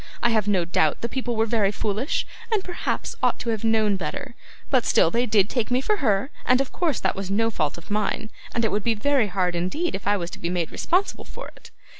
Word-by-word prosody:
I 240 - +4
have 215 -2 +1
no 190 -4 +2
doubt 160 -3 +1
the 235 - -1
people 245 -1 -2
were 220 0 +2
very 215 -3 +2
foolish, 215 +7 -1 0.3
and 425 -3 +2
perhaps 355 -1 -3
ought - - +2
to 235 - -2
have 220 -1 -3
known 220 -3 +3
better, 235 - -5 0.4
but 260 -3 +4
still 165 - +4
they 240 +4 +1
did 210 -3 +4
take 235 -1 -1
me 250 +1 +2
for 420 +10 +1
her, 220 - +1
and 255 0 +4
of 275 - -1
course 335 -5 0
that - - 0
was 195 -1 -4
no 225 +3 +2
fault 155 -7 -1
of 170 +5 -12
mine, 215 +1 -1 0.2
and 230 -1 +1
it 220 - +1
would 205 0 0
be 230 -1 +2
very 260 +1 +2
hard 180 -2 0
indeed 240 - -1
if 190 - -5
I 205 0 +3
was 175 -2 -4
to - - -8
be 170 - -2
made 175 -3 -1
responsible 370 +3 0
for - - -9
it. - - -16
220 Hz, 245 wpm, -24 LUFS, 195-250 Hz, 0.4 s, I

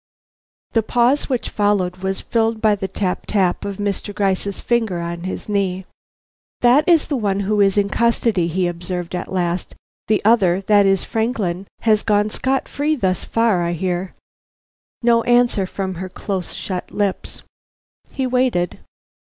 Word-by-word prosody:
The 225 - +2
pause 245 +6 +1
which 255 -3 -2
followed 200 -3 +1
was 190 +1 -3
filled 225 -1 0
by 215 -1 +3
the 195 -2 -3
tap 190 -1 -3
tap 190 -4 +1
of 200 -1 -4
Mr. 205 0 -3
Gryce's 195 -1 -1
fingers 225 -7 0
on 170 +1 -5
his 185 - -5
knee. 190 -3 -1 0.8
"That 265 +8 +4
is 330 -3 +5
the 290 - -1
one 200 -5 0
who 205 +1 +1
is 195 0 +3
in 200 -1 +3
custody," 230 -5 +1
he 180 +2 0
observed 175 0 -4
at 180 - -4
last. 175 -1 -2 0.3
"The 215 -1 +3
other, 195 -5 +4
that 205 0 +4
is 195 -1 +2
Franklin, 210 -5 -2
has 215 -2 +3
gone 210 0 +1
scot 265 +3 -1
free 300 +2 0
thus 185 - -1
far, 225 -6 +1
I 170 0 -1
hear." 180 +2 -3 0.9
No 235 -1 +4
answer 240 -5 +3
from 190 0 -4
her 185 - -5
close 185 -1 -4
shut 185 -2 -5
lips. 200 -2 -3 0.7
He 265 - -2
waited. 250 -9 0
200 Hz, 160 wpm, -20 LUFS, 185-230 Hz, 0.9 s, is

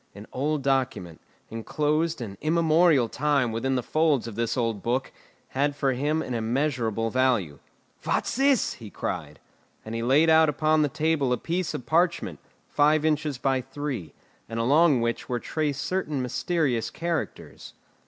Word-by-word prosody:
An 105 +1 -10
old 145 +2 -1
document, 125 -11 -1 0.3
enclosed 150 +7 -1
an 100 -4 -6
immemorial 160 -3 +3
time 140 -1 +1
within 130 +4 -1
the 125 - -1
folds 155 -5 +1
of 115 - -6
this 115 +4 -2
old 115 -4 -1
book, 125 +3 -1 0.4
had 140 +2 0
for 135 -2 +1
him 150 +5 0
an 125 - -5
immeasurable 115 -2 -1
value. 120 - +1 0.4
"What's - - -1
this?" 270 0 +2
he 110 -3 -11
cried. 75 -6 -5 0.5
And 110 - -6
he 115 - -2
laid 135 +7 +4
out 160 -1 +6
upon 155 +1 +2
the 150 - +2
table 150 -2 0
a 125 - +2
piece 175 +6 -2
of 125 - -6
parchment, 165 - +1 0.3
five 150 +1 +3
inches 150 -3 0
by 130 0 0
three, 135 - -6 0.3
and 115 0 -4
along 140 +2 +4
which 115 0 -2
were 120 -1 -1
traced 150 +1 -2
certain 180 -6 -2
mysterious 130 -1 -1
characters. 170 -1 -5
135 Hz, 155 wpm, -26 LUFS, 115-155 Hz, 0.5 s, out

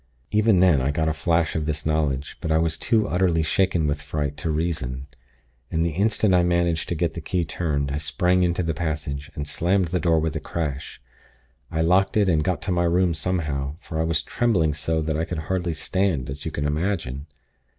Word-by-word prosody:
"Even 105 -3 +4
then, 85 -8 +5
I 65 - 0
got 80 +2 0
a - - 0
flash 80 +1 +1
of 80 -2 -1
this 75 -1 -2
knowledge; 75 -3 0
but 80 - -2
I 80 - +4
was 80 0 +1
too 110 -3 +1
utterly 90 -3 +2
shaken 90 0 +1
with 75 0 -1
fright, 75 -1 -3
to 75 +2 -3
reason; 75 -5 -2 0.6
and 80 +1 0
the 85 - 0
instant 100 +3 +2
I 90 - +5
managed 85 -2 +1
to 85 - -1
get 85 0 0
the 85 - -6
key 90 +2 -1
turned, 70 -4 -2
I 70 - -1
sprang 85 +6 +1
into 90 0 +1
the 80 -1 -1
passage, 75 -3 -3
and 75 0 -4
slammed 90 +3 +1
the 90 +1 0
door 85 -2 +3
with 80 0 -2
a - - -1
crash. 75 -3 -4 0.7
I 80 - -1
locked 95 +5 +3
it, 105 -2 +4
and 80 -3 +2
got 85 -2 -1
to 95 - -2
my 85 -1 +2
room 90 0 +2
somehow; 75 -4 -2
for 80 -3 -5
I - - +2
was 80 0 0
trembling 90 -11 +1
so 80 +1 -1
that 80 0 -1
I - - +1
could 85 0 -4 0.2
hardly 90 -3 -1
stand, 80 -5 -1
as 70 +2 -7
you 80 - -2
can 70 - -3
imagine. 75 -3 -2
80 Hz, 215 wpm, -24 LUFS, 75-90 Hz, 0.7 s, then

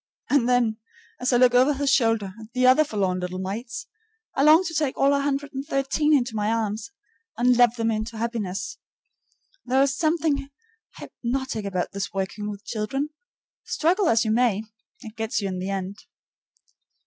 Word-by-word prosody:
And 260 -4 +3
then, 240 -3 +2 0.4
as 250 +1 0
I 245 - +4
look 250 0 +5
over 260 +4 +4
his 280 0 +1
shoulder 225 -7 +2
at 220 +1 -13
the 255 0 +2
other 255 +4 +6
forlorn 195 -9 -1
little 180 0 -4
mites, 220 +6 -5 0.5
I - - 0
long 310 +5 +7
to 335 - -4
take 300 -4 -1
all 275 +1 +4
113 280 +1 0
into 240 -3 -3
my 210 0 0
arms 220 -1 -2 0.5
and 245 +1 +4
love 240 -1 +5
them 225 -1 0
into 220 +1 -3
happiness. 230 - -3 0.8
There 260 +2 +3
is 275 -1 0
something 310 -3 0 0.5
hypnotic 245 -3 -4
about 185 -3 -2
this 200 0 -4
working 195 +2 -3
with 205 -1 -8
children. 270 +7 -2 0.5
Struggle 350 +3 +1
as 225 0 +3
you 215 - +1
may, 220 -3 +2 0.4
it 220 -3 -10
gets 220 -2 -2
you 200 - -2
in 185 -1 -4
the 185 +2 -4
end. 195 +1 -4
240 Hz, 165 wpm, -24 LUFS, 210-275 Hz, 0.8 s, long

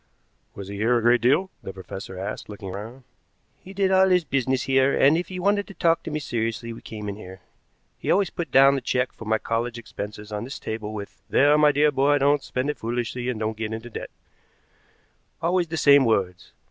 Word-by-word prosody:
"Was 100 -1 -8
he 100 0 -6
here 115 +4 +2
a - - 0
great 120 +1 +4
deal?" 150 +11 +2
the - - -7
professor 95 0 -8
asked, 95 +3 -5
looking 100 -2 -7
round. 110 +7 -8 0.6
"He 190 - -12
did 195 -1 +1
all 190 0 +5
his 180 -1 +3
business 130 -2 0
here, 135 0 +2
and 140 +3 +6
if 170 +1 -1
he 185 - -7
wanted 200 +2 +1
to 200 - -11
talk 165 -1 +2
to - - -6
me 150 - -2
seriously 115 -4 -3
we - - -11
came 105 -1 -7
in 100 0 -5
here. 95 -3 -11 0.6
He - - -5
always 195 -1 +2
put 170 -4 -4
down 135 +2 +6
the 135 - -1
check 125 +1 0
for 115 - -11
my 110 +1 +2
college 115 +2 -2
expenses 105 -1 -8
on 105 0 -3
this 130 +3 -7
table 110 -1 -5
with, 100 -2 -8
'There, 145 +2 +5
my 150 -1 +6
dear 150 +1 +3
boy, 145 +1 +3
don't 145 +1 +3
spend 130 +3 -2
it - - -12
foolishly 120 +1 -3
and 120 -4 -3
don't 110 0 -2
get 110 0 -4
into 115 +2 -7
debt' - - -6 1.3
always 175 +1 +1
the 160 0 -4
same 140 -2 +6
words. 95 -6 -1
125 Hz, 220 wpm, -24 LUFS, 110-145 Hz, 1.3 s, and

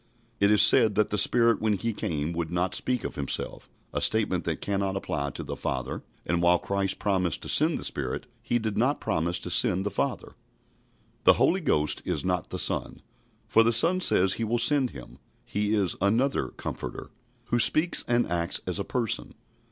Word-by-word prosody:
It 100 - +3
is 105 0 +6
said 110 -2 +5
that 105 - +1
the 105 - -1
Spirit 115 +2 +3
when 110 -1 +1
He 110 +4 -2
came 80 -4 -3
would 85 -1 -3
not 90 +2 -1
speak 125 -2 -1
of - - -5
Himself 70 -2 -4 0.2
a - - -2
statement 105 -5 0
that 80 -2 -3
cannot 100 -1 -2
apply 75 -7 -3
to - - -8
the - - -6
Father; - - -4 0.2
and 85 +1 -1
while 90 +1 +4
Christ 100 +1 -2
promised 95 -5 -1
to - - -5
send - - +3
the - - -7
Spirit, - - -4 0.2
He 120 - -1
did 110 -3 -3
not 130 +6 +1
promise 85 +2 -1
to - - -5
send 95 +2 +4
the 105 - -2
Father. 130 +6 -3 0.9
The - - +8
Holy 190 +2 +2
Ghost 75 - 0
is - - -3
not 90 -2 -2
the - - -4
Son, - - -2 0.5
for 115 - +4
the 115 +1 +3
Son 170 +11 +3
says 95 - +3
He 115 - -3
will 115 +2 0
send 135 +2 +3
Him. 65 - -12 0.3
He 105 +1 -1
is 100 -4 0
"another 115 +8 +1
Comforter," - - -7 0.4
who 120 - +1
speaks 160 +7 +5
and 120 0 +2
acts 85 +1 -1
as 90 +2 -3
a - - -1
person. 115 0 -3
100 Hz, 195 wpm, -26 LUFS, 90-115 Hz, 0.9 s, The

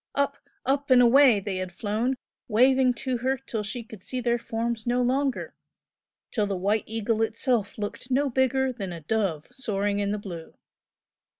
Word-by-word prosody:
Up, 280 0 +1 0.3
up 280 +2 0
and 255 -1 +7
away 245 -2 +6
they 195 -1 -3
had 185 -1 -4
flown, 220 +7 -1 0.3
waving 255 +2 +4
to 255 +2 -2
her 260 +3 0
till 240 -4 -4
she 220 +3 -5
could 220 -3 -12
see 255 - -3
their 240 -1 +1
forms 230 0 -3
no 245 +1 +2
longer 265 +2 0 0.8
till 210 -4 0
the 195 -2 -2
"White 205 +4 +1
Eagle" 225 0 -1
itself 225 -1 0
looked 210 +4 -5
no 275 +3 +2
bigger 260 0 +1
than 195 -6 -5
a 170 -1 -7
dove 170 -4 -1
soaring 205 -5 -1
in 200 0 0
the 210 - 0
blue. 175 -5 -8
230 Hz, 175 wpm, -26 LUFS, 205-260 Hz, 0.8 s, and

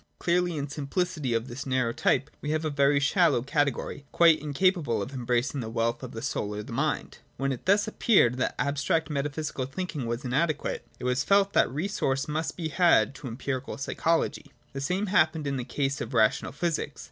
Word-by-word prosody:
Clearly, 175 -1 +1
in 145 0 -2
simplicity 150 -1 -2
of 115 +2 -1
this 130 +3 -7
narrow 130 -3 +1
type 145 +4 +1
we 150 - -4
have 155 +1 0
a 155 - 0
very 140 0 +3
shallow 140 -3 +3
category, 140 0 -1
quite 165 -2 +5
in 150 -1 -5
capable 170 - +2
of 130 - -5
embracing 125 +2 -1
the 115 -3 -4
wealth 115 +1 -1
of 130 -2 -7
the 115 - -7
soul 105 -6 -2
or - - -4
of - - -10
the - - -8
mind. - - -2 0.2
When 135 +1 0
it 130 +5 -6
thus 205 +2 +4
appeared 190 - +3
that 130 - -1
abstract 145 +3 0
metaphysical 145 -2 -2
thinking 145 -3 -4
was 120 +4 -3
inadequate, 145 +4 -1
it - - -11
was 125 +1 +1
felt 200 +3 +3
that - - +4
resource 135 -3 -1
must 155 +1 -2
be 165 -3 -3
had 155 -9 +4
to 135 0 -8
empirical 130 +2 -4
psychology. 165 +4 -1 0.2
The 135 - -4
same 180 +8 0
happened 175 -6 +2
in 140 -1 -1
the 125 - -3
case 135 +2 -2
of 120 +2 -5
Rational 110 -1 +2
Physics. 150 -2 -2
140 Hz, 200 wpm, -27 LUFS, 125-165 Hz, 0.2 s, quite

